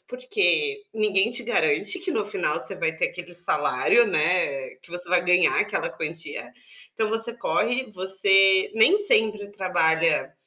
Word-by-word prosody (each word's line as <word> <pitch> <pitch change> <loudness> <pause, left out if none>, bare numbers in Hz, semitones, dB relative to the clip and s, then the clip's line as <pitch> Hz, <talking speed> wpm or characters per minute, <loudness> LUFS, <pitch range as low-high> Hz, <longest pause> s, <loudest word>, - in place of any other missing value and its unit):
porque 445 -3 -1
ninguém 210 0 +1
te 240 0 -4
garante 375 - 0
que 365 +1 -4
no 215 -9 -1
final 195 -7 -2
você 195 - -4
vai 160 -3 -2
ter - - 0
aquele 175 0 -11
salário, 175 +7 +2
né, 155 -6 0
que 130 - -18
você 175 0 -6
vai 180 -1 +3
ganhar 180 -1 +3
aquela 210 -1 -2
quantia, 165 +2 -7 0.4
então 220 -1 -1
você 225 +1 -2
corre, 245 0 -1
você 190 0 +3
nem 225 - +5
sempre 215 - +1
trabalha 165 -5 0
195 Hz, 150 wpm, -24 LUFS, 175-235 Hz, 0.4 s, nem